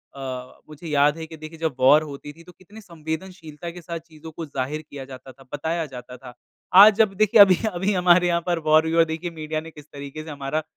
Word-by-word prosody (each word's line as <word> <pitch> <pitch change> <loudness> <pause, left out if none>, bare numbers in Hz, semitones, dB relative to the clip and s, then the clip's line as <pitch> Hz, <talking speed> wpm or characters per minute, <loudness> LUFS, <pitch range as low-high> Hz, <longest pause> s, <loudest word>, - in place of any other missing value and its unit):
अ, 130 -2 -7
मुझे 155 +2 -11
याद 145 +1 +2
है 160 - -6
कि 160 -1 -11
देखिए 155 +1 -11
जब 160 -5 -2
वॉर 145 +4 +5
होती 145 0 -9
थी 165 +2 -17
तो 180 - -15
कितनी 200 +5 -16
संवेदनशीलता 165 -1 -7
के 175 0 -11
साथ 170 0 -6
चीज़ों 160 -1 -14
को 165 +1 -7
ज़ाहिर 145 +2 -4
किया 135 -2 -8
जाता 130 0 -12
था, 135 +2 -19
बताया 160 +2 -2
जाता 125 -2 -10
था। 125 -1 -12 0.5
आज 215 0 +8
जब 215 -3 +3
देखिए 215 0 +5
अभी-अभी 195 0 +3
हमारे 180 -1 +4
यहाँ 170 0 +1
पर 175 -2 0
वॉर 155 +1 +6
हुई 160 - -2
है - - +1
और 165 - +6
देखिए 165 +2 -5
मीडिया 155 -1 -5
ने 165 0 -11
किस 150 -1 -14
तरीक़े 140 +2 -8
से 160 - -11
हमारा 145 +2 -3
160 Hz, 235 wpm, -23 LUFS, 145-170 Hz, 0.5 s, आज